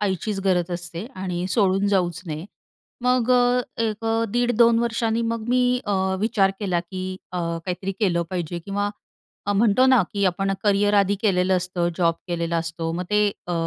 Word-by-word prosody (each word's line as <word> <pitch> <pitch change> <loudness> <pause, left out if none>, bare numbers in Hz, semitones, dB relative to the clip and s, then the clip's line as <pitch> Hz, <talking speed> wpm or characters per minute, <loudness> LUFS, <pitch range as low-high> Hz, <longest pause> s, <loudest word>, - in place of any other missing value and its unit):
आईचीच 195 0 -1
गरज 180 -2 +1
असते 175 +3 -6
आणि 185 -1 -3
सोडून 195 -1 +2
जाऊच 180 -3 +1
नये. 155 0 -5 0.6
मग 250 -1 +2
अ, 245 0 +4 0.2
एक 220 0 -2 0.3
1.5-2 235 0 +3
वर्षांनी 230 -1 0
मग 230 -1 -3
मी, 250 0 +3 0.2
अ, 205 - 0 0.3
विचार 205 -3 +2
केला, 185 -4 0
की 185 +1 -6 0.2
अ, 180 - -2
काहीतरी 175 +3 -3
केलं 175 -5 +2
पाहिजे, 175 -2 -3
किंवा 205 +4 -2 0.6
अ, 205 - +2
म्हणतो 220 +4 +4
ना, 260 -4 +5
की 200 -1 0
आपण 195 +2 0
करियर 205 0 +3
आधी 200 0 +3
केलेलं 185 -3 +2
असतं, 180 -1 -1
जॉब 170 -2 +2
केलेला 170 -1 -1
असतो, 165 0 -3
मग 180 +2 -3
ते 210 0 +3 0.2
अ, 175 - -3
195 Hz, 165 wpm, -23 LUFS, 175-215 Hz, 0.6 s, ना